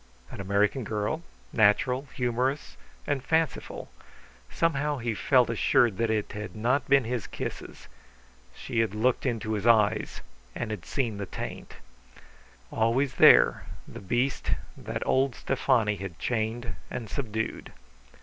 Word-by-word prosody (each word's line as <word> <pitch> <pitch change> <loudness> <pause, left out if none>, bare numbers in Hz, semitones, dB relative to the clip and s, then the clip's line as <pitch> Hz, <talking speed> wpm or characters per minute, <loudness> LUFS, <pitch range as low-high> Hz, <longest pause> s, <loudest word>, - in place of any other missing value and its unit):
An - - -6
American 100 +6 +1
girl, 105 +9 -2 0.3
natural, 125 +6 +3
humorous, 125 - -1 0.3
and 140 -3 -1
fanciful. 160 -1 -1 0.6
Somehow 150 -3 0
he 120 -2 -2
felt 125 +3 +3
assured 115 -2 +2
that 115 -1 +1
it 110 -2 -1
had 105 +2 -7
not 125 +6 0
been 140 -1 +5
his 120 -2 -3
kisses; - - -7 0.7
she 115 - -3
had 110 -2 +1
looked 125 +4 +1
into 110 -3 -2
his 105 +1 -1
eyes 110 -3 +3 0.3
and 110 -2 -3
seen 115 - -2
the 100 - -4
taint. - - -7 1.0
Always 120 +5 +1
there, - - +6 0.2
the - - -9
beast 120 +7 -1 0.3
that - - -5
old 135 -1 +2
Stefani 120 -6 +1
had 95 -3 -7
chained 115 +3 -2 0.2
and 120 -3 -5
subdued. 110 -2 -4
115 Hz, 130 wpm, -27 LUFS, 105-130 Hz, 1.0 s, there